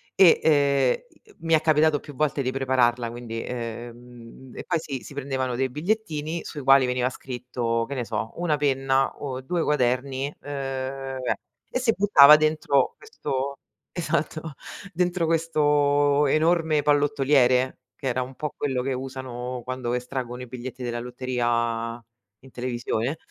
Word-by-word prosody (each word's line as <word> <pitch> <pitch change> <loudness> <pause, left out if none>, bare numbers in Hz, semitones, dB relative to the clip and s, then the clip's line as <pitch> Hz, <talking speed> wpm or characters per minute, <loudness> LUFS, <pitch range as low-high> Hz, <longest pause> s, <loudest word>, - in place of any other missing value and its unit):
e, 185 -3 +7
ehm, 140 -4 +3
i 440 - -27
uhm, - - -24
mi 165 0 0
è 155 - +2
capitato 155 -1 +3
più 145 0 -12
volte 150 0 0
di 130 -1 -1
prepararla, 125 -3 +1
quindi 115 -1 -6
ehm, 120 +1 -8
e - - -6
poi 170 -2 0
si 140 -5 -5
si - - -10
prendevano 130 -2 -2
dei 135 +1 0
bigliettini 160 - -2
sui 150 - -6
quali 135 0 +6
veniva 125 0 0
scritto, 125 -3 -3
che 140 - -6
ne 125 -2 -2
so, 110 0 -3
1 170 -3 +1
penna 135 -2 +1
o 130 -2 -5
2 170 +6 -1
quaderni, 135 0 0
uhm, 135 -1 -4 0.5
e - - 0
si 245 -3 +2
buttava 150 -7 +8
dentro 155 -3 +1
questo 140 - -4 0.4
esatto, 160 -2 -2 0.4
dentro 175 0 0
questo 145 -3 +2
enorme 160 0 +2
pallottoliere, 140 -3 +3 0.2
che 135 - -4
era 130 0 0
un 130 +1 -6
po' 150 +1 -4
quello 130 -3 -1
che 135 +1 -2
usano 130 -1 -5
quando 130 -1 -3
estraggono 125 0 -4
i 125 - -7
biglietti 125 +1 -7
della 120 -1 -3
lotteria 120 -2 -2 0.4
in 135 - -16
televisione. 125 +2 -2
135 Hz, 150 wpm, -25 LUFS, 125-150 Hz, 0.5 s, buttava